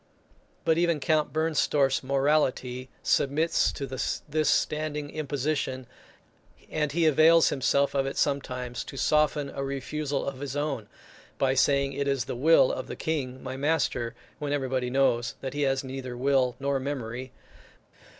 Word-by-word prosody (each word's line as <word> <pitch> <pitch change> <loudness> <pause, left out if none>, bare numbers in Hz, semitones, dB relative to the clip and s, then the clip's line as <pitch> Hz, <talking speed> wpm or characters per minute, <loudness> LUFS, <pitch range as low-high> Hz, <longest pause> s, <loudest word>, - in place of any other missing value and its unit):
But 165 0 +3
even 170 -3 +2
Count 155 0 +1
Bernstorff's 150 -4 +1
morality 135 -2 0
submits 150 +4 +2
to 140 - -4
this 145 +3 -1
standing 150 -1 0
imposition; 140 -3 -2 0.9
and 150 -2 0
he 165 +2 +1
avails 160 +2 +6
himself 140 +1 +1
of 135 -1 +1
it 135 - -5
sometimes, 125 -4 -1
to 135 - -9
soften 150 -1 +2
a 140 - -4
refusal 140 +1 -3
of 135 -2 -4
his 140 -1 -5
own, 145 -7 -2 0.5
by 135 -1 +2
saying 140 +1 +2
it 140 +1 -2
is 135 -4 0
the - - -4
will 145 +1 +5
of 130 - -4
the - - -6
King, 130 -5 -3
my 130 0 -5
master, 135 -5 0 0.2
when 145 -1 -3
everybody 130 -3 -1
knows 125 -2 +1
that 135 -1 -4
he 145 - -2
has 135 -1 +1
neither 130 -2 -6
will 130 -1 +2
nor 140 0 0
memory. 130 -2 -5
140 Hz, 150 wpm, -27 LUFS, 130-150 Hz, 0.9 s, avails